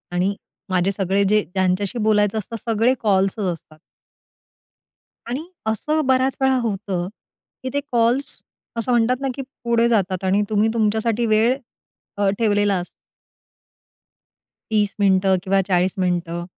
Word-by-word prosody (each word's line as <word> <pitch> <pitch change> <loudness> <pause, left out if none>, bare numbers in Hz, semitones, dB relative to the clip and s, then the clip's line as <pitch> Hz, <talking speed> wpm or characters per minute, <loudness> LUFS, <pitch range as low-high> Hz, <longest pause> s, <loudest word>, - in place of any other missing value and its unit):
आणि 190 +3 +1 0.3
माझे 185 +1 +1
सगळे 195 0 0
जे 210 0 +4
ज्यांच्याशी 190 +4 0
बोलायचं 210 -1 +2
असतं, 230 +3 -7
सगळे 230 +3 +2
कॉल्सच 195 -1 +1
असतात. 155 -1 -15 1.5
आणि 275 +7 -3 0.2
असं 300 +8 0
बऱ्याच 260 0 +2
वेळा 265 -1 +3
होतं, 195 -5 -2 0.6
की 260 - -2
ते 285 - +1
कॉल्स 240 +3 +1 0.4
असं 230 +2 -1
म्हणतात 245 +2 +2
ना, 270 - -1
की 275 - -4 0.2
पुढे 235 0 +2
जातात 190 -4 0
आणि 195 +2 +3
तुम्ही 215 +1 +2
तुमच्यासाठी 220 +1 +1
वेळ 225 +3 +3 0.6
अ, 200 -1 +2
ठेवलेला 205 -3 +2
असतो. 175 - -7 1.8
30 210 -2 +1
मिनिटं 190 -1 +3
किंवा 195 0 +2
40 180 0 +2
मिनिटं. 175 -2 -1
210 Hz, 130 wpm, -21 LUFS, 190-235 Hz, 1.8 s, जे